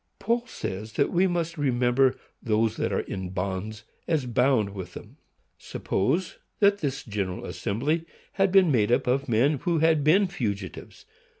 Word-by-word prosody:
Paul 235 Hz, +3 st, -1 dB
says 105 Hz, -, -6 dB
that 140 Hz, -, +1 dB
we 180 Hz, +2 st, +3 dB
must 170 Hz, -2 st, -2 dB
remember 130 Hz, -1 st, +2 dB, 0.3 s
those 110 Hz, -1 st, +1 dB
that -, -, -1 dB
are -, -, 0 dB
in 95 Hz, -2 st, -5 dB
bonds, 95 Hz, +4 st, -4 dB, 0.2 s
as 155 Hz, -6 st, +1 dB
bound 125 Hz, -3 st, +2 dB
with 95 Hz, -3 st, -8 dB
them. -, -, -11 dB, 0.4 s
Suppose 165 Hz, -, -2 dB, 0.2 s
that 200 Hz, -1 st, +4 dB
this 140 Hz, -2 st, -3 dB
General 100 Hz, -5 st, -4 dB
Assembly 150 Hz, +11 st, -2 dB, 0.3 s
had 195 Hz, -1 st, +1 dB
been 190 Hz, -4 st, +5 dB
made 110 Hz, -4 st, +2 dB
up 120 Hz, -, +2 dB
of 135 Hz, +2 st, 0 dB
men 130 Hz, +6 st, +2 dB
who 170 Hz, +3 st, 0 dB
had 160 Hz, -1 st, +3 dB
been 180 Hz, +7 st, +5 dB
fugitives. 100 Hz, -, -5 dB
130 Hz, 160 wpm, -26 LUFS, 105-165 Hz, 0.4 s, been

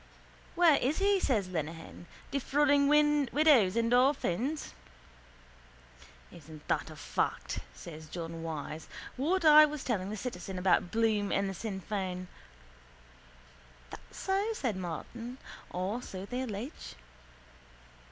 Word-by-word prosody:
—Where 340 Hz, -4 st, +6 dB
is 275 Hz, +5 st, 0 dB
he? 395 Hz, 0 st, +3 dB
says 220 Hz, -, +1 dB
Lenehan. 165 Hz, 0 st, -6 dB, 0.2 s
Defrauding 285 Hz, +1 st, +3 dB
widows 295 Hz, -6 st, +4 dB
and 230 Hz, +1 st, +1 dB
orphans. 265 Hz, -, +1 dB, 1.6 s
—Isn't 155 Hz, -2 st, -13 dB
that -, -, 0 dB
a -, -, -10 dB
fact, -, -, -2 dB, 0.2 s
says 160 Hz, -2 st, -10 dB
John 165 Hz, -1 st, -6 dB
Wyse, 155 Hz, -1 st, -5 dB, 0.3 s
what 335 Hz, +7 st, 0 dB
I 305 Hz, 0 st, +9 dB
was 300 Hz, -2 st, -6 dB
telling 200 Hz, -6 st, -1 dB
the 215 Hz, -, -4 dB
citizen 200 Hz, -4 st, -5 dB
about 180 Hz, -1 st, +2 dB
Bloom 220 Hz, -2 st, +1 dB
and 195 Hz, 0 st, +1 dB
the 195 Hz, -, -3 dB
Sinn 195 Hz, 0 st, -5 dB
Fein? 185 Hz, -3 st, -4 dB, 1.6 s
—That's -, -, -12 dB
so, 395 Hz, +3 st, 0 dB
says 255 Hz, -, -1 dB
Martin. 230 Hz, +8 st, -6 dB, 0.3 s
Or 190 Hz, +7 st, -3 dB
so 190 Hz, -5 st, -7 dB
they 250 Hz, +4 st, -4 dB
allege. 240 Hz, +3 st, -6 dB
225 Hz, 120 wpm, -31 LUFS, 185-285 Hz, 1.6 s, I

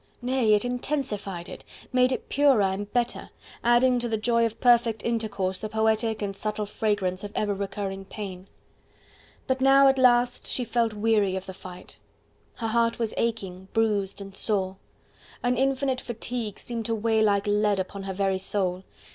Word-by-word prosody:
Nay, 245 Hz, -4 st, +3 dB
it 210 Hz, -, 0 dB
intensified 220 Hz, -8 st, -3 dB
it, -, -, -9 dB, 0.3 s
made 255 Hz, 0 st, +4 dB
it 255 Hz, -, -3 dB
purer 275 Hz, -6 st, +4 dB
and 195 Hz, +2 st, -2 dB
better, 245 Hz, -1 st, -1 dB, 0.3 s
adding 245 Hz, +1 st, +4 dB
to 240 Hz, 0 st, -2 dB
the 220 Hz, -, 0 dB
joy 230 Hz, +1 st, +2 dB
of 225 Hz, 0 st, -10 dB
perfect 235 Hz, -3 st, +3 dB
intercourse 200 Hz, -5 st, -1 dB
the 215 Hz, -, -4 dB
poetic 220 Hz, 0 st, +1 dB
and 195 Hz, -1 st, -3 dB
subtle 210 Hz, +1 st, -3 dB
fragrance 200 Hz, -3 st, -1 dB
of 205 Hz, -, -6 dB
ever 205 Hz, -1 st, 0 dB
recurring 195 Hz, -1 st, -4 dB
pain. 190 Hz, -2 st, -7 dB, 1.0 s
But 260 Hz, 0 st, -1 dB
now 275 Hz, +1 st, +6 dB
at 270 Hz, 0 st, +1 dB
last 245 Hz, -1 st, +3 dB
she 250 Hz, -, 0 dB
felt 230 Hz, -1 st, 0 dB
weary 210 Hz, -3 st, +2 dB
of 190 Hz, 0 st, -4 dB
the 190 Hz, -, -7 dB
fight: 180 Hz, -1 st, -11 dB, 0.6 s
her 225 Hz, -2 st, -3 dB
heart 230 Hz, 0 st, +2 dB
was 230 Hz, -3 st, -1 dB
aching, 195 Hz, -5 st, -3 dB
bruised 205 Hz, -3 st, 0 dB
and 195 Hz, 0 st, -9 dB
sore. 195 Hz, -3 st, -1 dB, 0.7 s
An 245 Hz, 0 st, +2 dB
infinite 265 Hz, 0 st, 0 dB
fatigue 235 Hz, -2 st, -4 dB
seemed 230 Hz, -2 st, -4 dB
to 230 Hz, -, 0 dB
weigh 220 Hz, 0 st, +1 dB
like 200 Hz, -2 st, +2 dB
lead 205 Hz, -1 st, +2 dB
upon 190 Hz, +1 st, -4 dB
her 195 Hz, 0 st, -4 dB
very 195 Hz, -1 st, 0 dB
soul. 185 Hz, -1 st, -1 dB
220 Hz, 170 wpm, -26 LUFS, 195-240 Hz, 1.0 s, now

